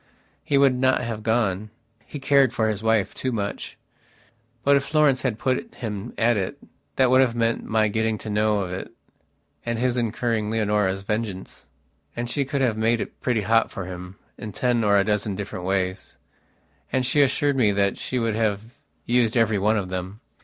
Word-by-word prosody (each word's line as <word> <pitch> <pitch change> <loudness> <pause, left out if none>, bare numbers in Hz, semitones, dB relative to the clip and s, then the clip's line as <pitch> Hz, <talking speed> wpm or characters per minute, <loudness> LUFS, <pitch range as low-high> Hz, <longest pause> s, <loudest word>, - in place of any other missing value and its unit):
He 140 - +1
would 140 -1 +5
not 130 +1 +2
have 115 -2 -4
gone; 110 -3 0 0.4
he 145 - -7
cared 135 -2 +4
for 110 - +1
his 105 -2 -2
wife 110 -3 +1
too 130 - -3
much. 100 -4 -4 0.9
But, 140 0 +5
if 140 - +2
Florence 145 -2 +2
had 125 -5 -1
put 130 - -2
him 110 -1 -5
at 115 0 +3
it, 95 -2 -3 0.4
that 130 -2 +3
would 130 +1 +6
have 125 -3 +2
meant 115 -1 0
my 110 -1 +2
getting 110 +1 0
to 110 - -8
know 105 0 +2
of 90 -2 -4
it, 95 - -6 0.7
and 120 -1 -2
his 125 +1 0
incurring 115 -2 -1
Leonora's 105 -3 0
vengeance. 105 -2 -4 0.5
And 120 0 -3
she 140 +3 -1
could 135 +1 -2
have 120 -5 +1
made 115 +1 +2
it - - -7
pretty 120 -4 +1
hot 115 +3 +2
for 95 - -6
him 90 0 -8 0.2
in 105 -2 -7
ten 120 +2 +1
or 100 -1 +4
a 100 - +4
dozen 105 -1 -1
different 95 -2 -6
ways. 95 -1 -2 0.7
And 130 -1 +1
she 135 +4 +3
assured 145 +1 +2
me 115 -6 +3
that 100 -1 0
she 130 - -3
would 115 -2 0
have 105 -2 0 0.4
used 120 -1 +2
every 110 -3 +2
one 105 +3 +2
of 95 -3 -3
them. 95 +3 -5
110 Hz, 190 wpm, -24 LUFS, 105-125 Hz, 0.9 s, would